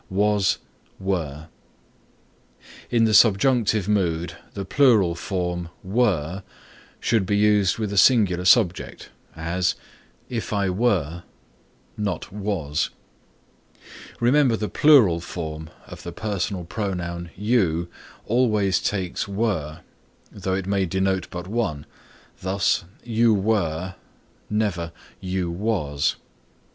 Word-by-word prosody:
WAS 100 0 +2 0.4
WERE 80 -6 -3 1.4
In 115 -2 +3
the 110 -1 +3
subjunctive 110 -1 +4
mood 90 -5 0 0.2
the 100 -1 -4
plural 110 -8 +4
form 90 -1 -3
were 95 -4 0 0.6
should 115 -3 +1
be 100 0 +2
used 105 -3 +3
with 105 -3 -3
a - - -3
singular 100 -9 +4
subject; 90 -2 +2 0.2
as, 85 +3 -1 0.5
"If 115 -3 -4
I 100 -2 +1
were," 90 -6 0 0.8
not 100 -4 -3
was. 95 -8 -2 1.3
Remember 125 0 +3
the 105 0 -3
plural 125 - +5
form 80 -2 -6 0.2
of - - -11
the - - -7
personal 100 -3 -3
pronoun 85 -2 -4
you 95 -6 +1 0.4
always 110 -5 +2
takes 95 -2 -2
were, 95 -7 -2 0.5
though 95 -1 -2
it 95 -1 -3
may 95 -1 0
denote 95 +1 0
but 90 -1 -6
one. 100 -10 -2 0.5
Thus, 95 -1 0 0.2
"You 115 -1 +3
were," 95 -4 0 0.6
never 95 -6 -1 0.3
"you 90 -2 -2
was." 85 -7 -1
95 Hz, 105 wpm, -23 LUFS, 85-105 Hz, 1.4 s, plural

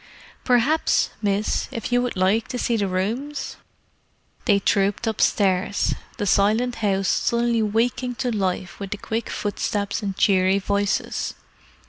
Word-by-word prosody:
"Perhaps, 255 +6 +2
miss, 205 0 0
if 230 +2 -5
you 245 0 +3
would 245 -5 -3
like 195 +5 +2
to 250 - -4
see 240 -1 0
the 205 -3 0
rooms?" 225 +11 -3 0.9
They 205 -4 +4
trooped 200 +2 +1
upstairs, 205 -2 +1 0.2
the 205 - -2
silent 215 +6 +2
house 195 -3 0
suddenly 235 +2 +1
waking 235 +3 0
to 245 +1 -1
life 185 -2 -2
with 200 -1 -5
the 210 - -4
quick 225 +2 -3
footsteps 205 -1 -2
and 195 -2 -4
cheery 190 -1 +3
voices. 200 +1 -1
210 Hz, 135 wpm, -23 LUFS, 195-235 Hz, 0.9 s, They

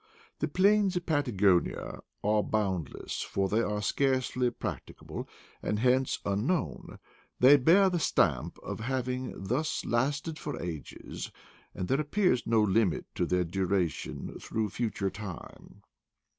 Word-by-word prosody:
The - - 0
plains 200 0 +3
of 175 -1 -2
Patagonia 105 - +1 0.2
are 105 +1 +3
bound 95 -7 -1
less, - - -5
for 95 0 -1
they 110 +4 +2
are 105 -2 -1
scarcely 130 +1 +1
practicable, 120 - -6 0.3
and 105 - -1
hence 130 +3 +2
unknown; 110 - -1 0.4
they 130 +3 +8
bear 170 +9 +5
the 180 -2 +1
stamp 75 - +1
of - - -5
having 125 +1 -2
thus 130 +10 -1
lasted 140 +6 0
for 145 -4 -5
ages, 80 -7 -6 0.4
and 90 - -3
there 135 +3 +2
appears 150 - +1
no 115 -2 +4
limit 100 -3 +2
to - - -1
their 90 0 +2
duration 90 0 -2
through 110 -1 -2
future 100 -3 -2
time. 100 -5 -9
115 Hz, 130 wpm, -30 LUFS, 100-140 Hz, 0.4 s, they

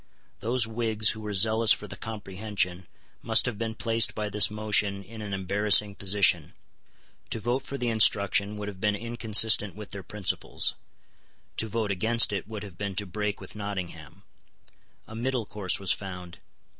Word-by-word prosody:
Those 120 +1 +2
Whigs 110 -1 +1
who 110 - -9
were 105 -1 -6
zealous 110 +3 +5
for - - +1
the - - -9
Comprehension 100 -3 -4 0.3
must - - +4
have 115 -4 -4
been 115 -1 -4
placed 115 -1 +2
by 105 -1 -3
this 105 -2 +4
motion 105 -2 0
in 110 +3 -11
an 105 -1 -7
embarrassing 100 +2 +3
position. 100 0 +1 0.7
To - - -2
vote 120 +4 -2
for 140 - -7
the 120 -2 -2
instruction 105 -1 +2
would 105 0 -6
have 95 -2 -9
been 105 -1 +1
inconsistent 110 -2 +3
with 105 -1 -10
their 100 - -6
principles. 100 0 0 0.8
To 110 - +2
vote 110 -1 -3
against 110 +3 +3
it 100 -1 -4
would 110 -2 -7
have 95 -4 -12
been 100 -2 -4
to 105 - -2
break 105 +2 -4
with 95 - -11
Nottingham. 95 -8 -7 0.8
A - - -12
middle 120 0 -3
course 100 -3 0
was 100 -2 0
found. 90 -3 -6
105 Hz, 170 wpm, -26 LUFS, 100-110 Hz, 0.8 s, zealous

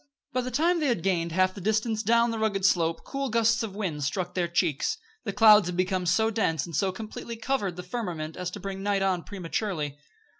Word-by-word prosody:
By 255 - +1
the 250 - -4
time 330 +7 +2
they 300 - +1
had 235 -10 0
gained 170 -3 0
half 185 +2 +2
the 200 - -9
distance 220 +2 0
down 235 +2 +3
the 225 - -3
rugged 200 -3 0
slope 165 -3 +2
cool 275 -1 -3
gusts 230 0 +3
of 215 -4 -4
wind 170 -9 -3
struck 180 +5 -2
their 180 -2 0
cheeks; 170 - 0 0.3
the - - -1
clouds 215 -5 +7
had 180 0 -3
become 185 0 0
so 220 +5 +3
dense 165 -9 0
and 170 -3 -7
so 190 +6 +1
completely 220 +3 -7
covered 225 -6 -1
the 180 - -7
firmament 175 -6 -4
as 180 -1 -3
to 205 - -8
bring 195 0 -5
night 200 -1 +1
on 185 -2 +1
prematurely. 170 -6 -3
195 Hz, 220 wpm, -27 LUFS, 175-225 Hz, 0.3 s, clouds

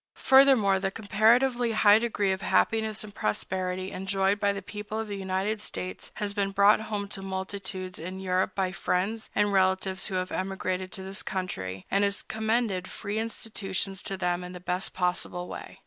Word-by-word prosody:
Furthermore, 265 -8 +5
the 195 0 0
comparatively 230 +4 +3
high 215 0 +6
degree 210 -4 0
of 190 +1 -2
happiness 220 0 +1
and 210 -1 -10
prosperity 185 - -2
enjoyed 195 +1 0
by 205 -1 +3
the 200 -1 -5
people 210 +1 -6
of 220 0 -2
the 205 - -4
United 195 +2 -1
States 185 -3 -5
has 205 -2 -2
been 200 -1 0
brought 200 +2 +5
home 210 -2 -3
to 195 - -5
multitudes 190 -1 -4
in 185 +4 -6
Europe 185 0 0
by 190 -2 0
friends 195 +4 -1
and 205 0 +2
relatives 190 0 +2
who 190 - -4
have 185 0 -1
emigrated 185 -1 -2
to 190 - -6
this 190 0 -4
country, 95 - -4
and 200 +1 +3
has 200 0 0
commended 220 -4 0
free 210 0 -4
institutions 195 -4 -2
to 195 - -3
them 180 0 -1
in 180 0 -7
the 180 - -7
best 180 +1 -3
possible 180 -1 -1
way. - - -8
195 Hz, 180 wpm, -28 LUFS, 185-210 Hz, -, high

